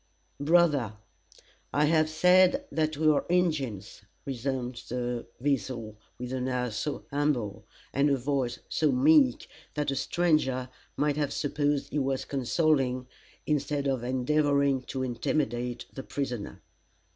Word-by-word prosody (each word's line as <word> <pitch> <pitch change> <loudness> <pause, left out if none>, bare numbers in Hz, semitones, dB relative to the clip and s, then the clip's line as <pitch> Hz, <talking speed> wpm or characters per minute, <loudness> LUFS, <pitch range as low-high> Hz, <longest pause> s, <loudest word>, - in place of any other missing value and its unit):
"Brother, 145 - +3 0.8
I 145 +1 +3
have 155 0 +3
said 180 - +4
that 155 -1 0
we 155 +1 +2
are 150 -2 +4
Injins," 155 - 0 0.2
resumed 130 -2 -3
The 120 -1 -3
Weasel, 125 -5 -2 0.2
with 125 +1 -5
an 130 0 -2
air 125 -2 -1
so 125 +7 -3
humble, 140 -8 -1 0.3
and 140 +2 +3
a 140 - +3
voice 130 -2 -1
so 155 -2 +1
meek, 135 -1 +4 0.3
that 150 -1 0
a - - -2
stranger 145 -7 +1 0.3
might 150 0 +1
have 145 -2 0
supposed 145 -1 -1
he 150 - 0
was 135 -1 -1
consoling, 135 -1 +1 0.4
instead 145 -1 0
of 135 -3 0
endeavoring 140 +1 +2
to 130 -1 -3
intimidate, 120 -1 -2
the 135 - -6
prisoner. 125 -6 -5
140 Hz, 130 wpm, -28 LUFS, 125-150 Hz, 0.8 s, said